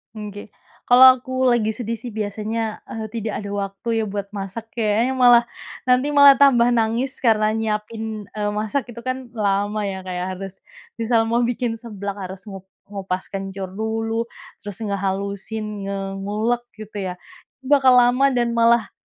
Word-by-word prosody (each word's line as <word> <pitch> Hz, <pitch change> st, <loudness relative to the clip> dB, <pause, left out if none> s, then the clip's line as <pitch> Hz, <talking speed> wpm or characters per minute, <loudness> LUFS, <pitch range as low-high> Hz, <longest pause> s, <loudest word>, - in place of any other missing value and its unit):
Nggih. 205 Hz, -1 st, -8 dB, 0.3 s
Kalau 250 Hz, +1 st, +8 dB
aku 260 Hz, +1 st, -1 dB
lagi 230 Hz, -3 st, +2 dB
sedih 230 Hz, 0 st, -4 dB
sih, 245 Hz, +1 st, -8 dB
biasanya, 215 Hz, +1 st, -3 dB
eee, 220 Hz, -1 st, -6 dB
tidak 220 Hz, -1 st, -4 dB
ada 205 Hz, -, -6 dB
waktu 205 Hz, +3 st, -2 dB
ya, -, -, -2 dB
buat 200 Hz, -1 st, -4 dB
masak, 200 Hz, +3 st, -6 dB
kayaknya, 230 Hz, +3 st, +1 dB
malah 245 Hz, -2 st, +7 dB, 0.4 s
nanti 255 Hz, +3 st, +3 dB
malah 285 Hz, -1 st, +8 dB
tambah 245 Hz, -4 st, +5 dB
nangis 235 Hz, +4 st, 0 dB
karena 215 Hz, -3 st, +3 dB
nyiapin, 220 Hz, -1 st, -3 dB
eee, 210 Hz, -1 st, -2 dB
masak, 220 Hz, +5 st, -2 dB
itu 235 Hz, -, -9 dB
kan, 255 Hz, -1 st, -5 dB
lama 205 Hz, -1 st, 0 dB
ya, 190 Hz, -1 st, -5 dB
kayak 180 Hz, -1 st, -3 dB
harus 195 Hz, 0 st, -7 dB, 0.5 s
misal 230 Hz, 0 st, +2 dB
mau 230 Hz, +1 st, +1 dB
bikin 240 Hz, -1 st, -1 dB
seblak 205 Hz, -4 st, -6 dB
harus 190 Hz, +1 st, -10 dB
ngup 195 Hz, -2 st, -10 dB, 0.2 s
ngupas 190 Hz, -2 st, -5 dB
kencur 195 Hz, -1 st, -5 dB
dulu, 225 Hz, +2 st, -2 dB, 0.3 s
terus 205 Hz, -2 st, -8 dB
ngehalusin, 200 Hz, +1 st, -3 dB
nge 200 Hz, 0 st, -3 dB, 0.2 s
ngulek 215 Hz, +5 st, -1 dB
gitu 215 Hz, -1 st, -9 dB
ya, 185 Hz, -2 st, -3 dB, 0.5 s
bakal 265 Hz, -2 st, +5 dB
lama 250 Hz, +2 st, +5 dB
dan 240 Hz, -1 st, +1 dB
malah, 230 Hz, -2 st, +3 dB
220 Hz, 155 wpm, -22 LUFS, 200-240 Hz, 0.5 s, Kalau